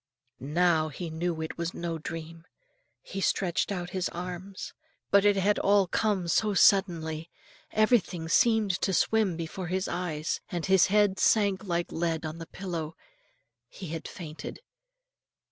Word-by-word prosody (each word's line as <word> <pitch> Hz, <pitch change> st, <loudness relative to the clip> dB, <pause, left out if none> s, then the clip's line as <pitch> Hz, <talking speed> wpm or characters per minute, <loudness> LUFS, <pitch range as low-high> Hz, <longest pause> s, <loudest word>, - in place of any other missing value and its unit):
Now 160 Hz, +2 st, +2 dB
he 165 Hz, +3 st, -6 dB
knew 165 Hz, 0 st, -2 dB
it 160 Hz, +1 st, -5 dB
was 170 Hz, +1 st, -3 dB
no 170 Hz, -1 st, -3 dB
dream. 165 Hz, +1 st, -7 dB, 0.6 s
He 195 Hz, -, -5 dB
stretched 185 Hz, 0 st, 0 dB
out 180 Hz, -2 st, -4 dB
his 185 Hz, -3 st, -1 dB
arms, 180 Hz, +2 st, -7 dB, 0.4 s
but 200 Hz, -1 st, +6 dB
it 205 Hz, -1 st, +5 dB
had 200 Hz, +2 st, +2 dB
all 200 Hz, -1 st, +4 dB
come 190 Hz, 0 st, 0 dB
so 210 Hz, +4 st, +2 dB
suddenly, 170 Hz, -5 st, +3 dB, 0.4 s
everything 215 Hz, -7 st, +2 dB
seemed 220 Hz, +2 st, +3 dB
to 190 Hz, -, +1 dB
swim 210 Hz, -5 st, +2 dB
before 170 Hz, +2 st, -5 dB
his 185 Hz, +2 st, -1 dB
eyes, 160 Hz, -3 st, -2 dB
and 175 Hz, -2 st, -3 dB
his 190 Hz, -2 st, +5 dB
head 205 Hz, -1 st, +3 dB
sank 200 Hz, -2 st, +3 dB
like 175 Hz, -2 st, -1 dB
lead 165 Hz, -1 st, -1 dB
on 155 Hz, +1 st, -5 dB
the 165 Hz, -, -8 dB
pillow. 170 Hz, -5 st, -5 dB, 0.7 s
He 180 Hz, +6 st, -9 dB
had 165 Hz, 0 st, -5 dB
fainted. 160 Hz, -, -8 dB
175 Hz, 145 wpm, -28 LUFS, 165-195 Hz, 0.7 s, but